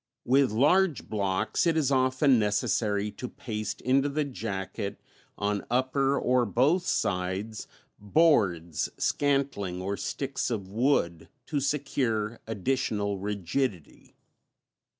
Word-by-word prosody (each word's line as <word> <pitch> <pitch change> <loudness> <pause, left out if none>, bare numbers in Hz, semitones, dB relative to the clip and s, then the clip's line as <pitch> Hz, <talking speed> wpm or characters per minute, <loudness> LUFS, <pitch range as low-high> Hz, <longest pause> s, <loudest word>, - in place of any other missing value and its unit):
With 135 +2 +4
large 150 - +2
blocks 100 - 0
it 165 -1 +2
is 145 -3 +1
often 130 0 +3
necessary 105 0 0
to 125 +4 -7
paste 105 -3 -5
into 135 +3 +2
the 150 +2 0
jacket, 100 -7 -5 0.4
on 105 -1 -1
upper 135 +3 +1
or 125 0 +2
both 140 - +2
sides, 95 +3 -1 0.3
boards, 100 - +2
scantling 135 -11 0
or 95 +2 -2
sticks 135 -1 -3
of 105 -6 -3
wood 105 - +1 0.2
to 145 +1 -1
secure 130 -6 -1
additional 105 -2 -1
rigidity. 100 - -3
115 Hz, 110 wpm, -28 LUFS, 100-135 Hz, 0.4 s, With